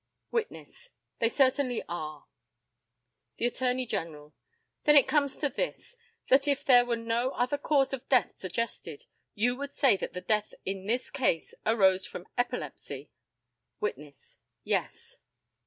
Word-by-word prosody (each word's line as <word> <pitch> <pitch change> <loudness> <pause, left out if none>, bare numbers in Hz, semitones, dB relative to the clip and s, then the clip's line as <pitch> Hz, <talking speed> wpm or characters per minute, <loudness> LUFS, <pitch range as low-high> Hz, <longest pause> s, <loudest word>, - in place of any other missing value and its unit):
Witness: 470 +1 -4 0.3
They 230 - +3
certainly 260 -1 +2
are. 155 -3 -6 1.1
The - - -1
ATTORNEY 250 +1 0
GENERAL: 150 -8 -5 0.5
Then 295 - +6
it 280 - +7
comes 280 -3 +2
to 295 - 0
this - - -4 0.3
that 275 +2 +5
if 280 -1 +1
there 245 -2 +7
were 235 - +1
no 230 +2 0
other 255 +4 0
cause 275 -3 +2
of 270 -1 -6
death 250 -8 +3
suggested, 185 -5 -4 0.3
you 245 +4 +2
would 280 0 -6
say 270 -7 +4
that - - -5
the 180 - -5
death 210 +3 0
in 195 0 -4
this 245 +3 0
case 245 - 0
arose 190 -4 +4
from 180 - -8
epilepsy? 200 - -4 0.7
Witness: 145 -8 -6 0.2
Yes. - - -2
240 Hz, 140 wpm, -29 LUFS, 190-270 Hz, 1.1 s, it